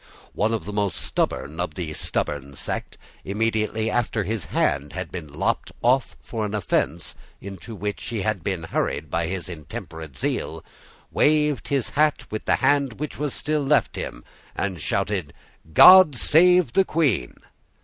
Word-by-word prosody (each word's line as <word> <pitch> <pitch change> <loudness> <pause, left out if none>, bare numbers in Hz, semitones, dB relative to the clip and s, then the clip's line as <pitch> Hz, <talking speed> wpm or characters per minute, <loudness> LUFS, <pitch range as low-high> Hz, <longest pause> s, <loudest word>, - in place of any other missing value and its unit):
One 110 +2 +1
of 110 -7 -2
the 105 - -6
most 100 -3 -1
stubborn 75 +4 -2
of 90 -3 -3
the 80 -4 -4
stubborn 70 -2 -2
sect, - - -4 0.3
immediately 110 +1 -1
after 115 -3 0
his 105 0 -3
hand 70 +1 0
had - - -5
been 80 -5 -7
lopped - - -1
off 130 +2 +2
for 115 -2 -5
an 105 0 -2
offence 100 -5 -1 0.3
into 100 +3 -9
which 105 0 -4
he 110 -5 -3
had 105 -5 -1
been 95 -4 -2
hurried 75 -2 -2
by 85 0 0
his 95 +1 -4
intemperate 80 -3 -8
zeal, - - -3 0.5
waved 150 -2 +2
his 140 -4 0
hat 150 0 +2
with 110 - -4
the - - +3
hand 140 -3 +3
which 150 +3 -6
was 150 -2 -2
still 150 0 0
left 145 +1 +2
him, - - -6 0.3
and 95 -5 -3
shouted 90 -6 -1 0.4
"God 180 - +9
save 175 +2 +5
the 195 - +5
Queen!" 145 - 0
105 Hz, 160 wpm, -24 LUFS, 85-135 Hz, 0.5 s, God